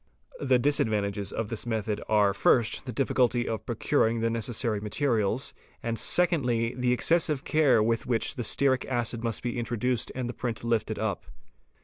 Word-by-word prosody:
The 130 -3 +3
disadvantages 105 -7 +1
of 110 -2 -3
this 115 +1 -4
method 110 -2 -2
are 105 -2 +3
first 115 +5 +2
the - - -3
difficulty 125 -2 +1
of 110 -2 -4
procuring 115 +1 +1
the 115 0 0
necessary 115 -1 -1
materials, 110 0 0 0.3
and 115 -1 -2
secondly 125 -10 +1
the 125 -1 0
excessive 150 +2 +2
care 135 -8 +3
with 115 +1 0
which 120 -2 0
the 120 - -4
stearic 130 +2 +2
acid 120 -2 -2
must 115 -3 -3
be 120 0 -2
introduced 120 +1 -1
and 125 -2 -3
the 120 - -4
print 115 -2 -4
lifted 110 -2 -1
up. 110 -4 -3
115 Hz, 160 wpm, -27 LUFS, 110-125 Hz, 0.3 s, The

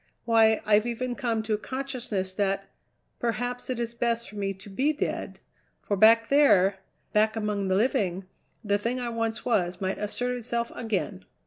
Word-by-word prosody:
Why, 225 -1 +4
I've 215 +2 +4
even 245 +1 -2
come 235 -4 -1
to 220 0 -1
a 210 - 0
consciousness 245 -8 -3
that 195 0 0 0.5
perhaps 245 +2 -2
it 250 -2 -2
is 235 0 -2
best 235 0 -1
for - - -12
me 200 -1 -1
to 190 +2 -14
be 265 +10 +1
dead, 300 - -3 0.4
for 200 - -2
back 225 +3 +6
there, 200 -10 +5 0.3
back 215 +1 +3
among 210 -3 -1
the 190 - +2
living, 195 -5 +1 0.4
the 205 -1 +1
thing 235 +4 -1
I 245 -1 -2
once 230 -1 -2
was 180 -6 +1
might 190 0 -2
assert 245 +4 -2
itself 235 -1 -3
again." 205 - -3
225 Hz, 175 wpm, -27 LUFS, 200-240 Hz, 0.5 s, back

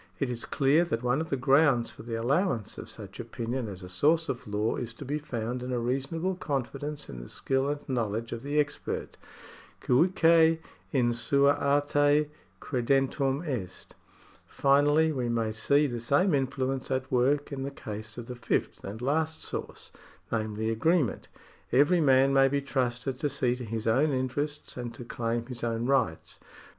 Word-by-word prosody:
It 135 -3 -1
is 120 -1 -4
clear 145 +4 +3
that 120 -8 -2
one 125 +5 +1
of 160 - -5
the 135 - 0
grounds 135 -1 +3
for - - -12
the 115 0 -5
allowance 120 - 0
of - - -8
such 100 -3 -10
opinion 120 +1 -4
as 95 -2 -7
a - - -7
source 155 - +2
of 120 - -4
law 105 +2 0
is 120 -1 -5
to - - -8
be 145 +3 -2
found 125 -3 -4
in 125 +1 -4
a 125 - 0
reasonable 135 +9 -1
confidence 145 -3 -4
in - - -8
the - - -10
skill 135 +1 0
and 145 0 -4
knowledge 115 -3 -2
of 115 - -4
the 145 +2 0
expert. 145 -1 -2 0.6
Guique 165 +2 +4 0.3
in 120 -4 +2
sua 140 +5 +3
arte 145 +1 +2 0.3
credendum 135 +3 0
est. 95 -10 -5 0.5
Finally 145 +3 +3
we 125 -5 -2
may 115 -2 0
see 140 +7 +2
the 120 -4 -3
same 145 +10 +2
influence 135 -1 -1
at 130 -1 -2
work 135 +4 +2
in 135 -1 -4
the 135 - -2
case 110 -4 -8
of 120 - -6
the 125 - -6
fifth 120 - -2
and 105 +4 -6
last 155 +4 0
source, - - -6 0.4
namely 110 0 -1
agreement. 150 - +1 0.4
Every 150 +7 +4
man 135 -1 +5
may 135 0 +6
be 140 +1 +1
trusted 125 -1 -2
to 145 - 0
see 125 -3 +1
to 125 - -7
his 110 0 -4
own 130 +7 +3
interests 140 +3 -3
and 120 -1 -4
to 120 - -9
claim 115 0 -2
his 120 -2 -7
own 115 0 -1
rights. 125 -12 0
130 Hz, 175 wpm, -28 LUFS, 120-145 Hz, 0.6 s, may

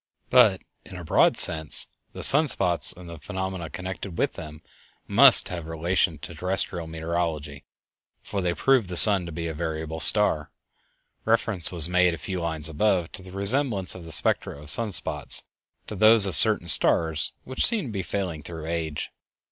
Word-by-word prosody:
But, 110 -7 +3 0.2
in - - -13
a 90 - -9
broad 80 - +1
sense, 80 -1 +3 0.3
the - - -5
sun 150 +3 +3
spots 90 -9 +1
and 90 -1 -11
the 85 -2 -11
phenomena 95 +1 -6
connected 95 +2 -8
with - - -1
them 75 -1 -11 0.4
must 125 +5 +5
have 85 -3 -7
a - - -11
relation 85 0 -1
to 75 - -11
terrestial 90 0 +3
meteorology, 80 -3 -5 0.6
for 100 -2 -5
they 90 -1 -2
prove 130 -7 +1
the 90 -1 -2
sun 100 -4 +8
to - - -8
be 85 +1 -6
a 80 - -5
variable 80 0 -6
star. 80 -4 +3 0.7
Reference 110 -6 -1
was 85 -3 -1
made, 90 -1 +1
a - - -12
few 95 0 -6
lines 80 -2 -2
above, 85 +2 -1
to - - -4
the 95 0 -12
resemblance 100 +1 -1
of 90 - -11
the 80 - -11
spectra 70 - 0
of 75 0 -8
sun 115 +2 -4
spots 80 -4 0 0.4
to 105 - -9
those 110 +1 +5
of 95 - -3
certain 105 -6 +2
stars 80 -1 +2
which 130 0 -3
seem 225 -7 0
to 120 - -8
be 100 -2 -4
failing 90 -3 -5
through 80 0 -10
age. 80 -2 -5
90 Hz, 180 wpm, -23 LUFS, 80-100 Hz, 0.7 s, sun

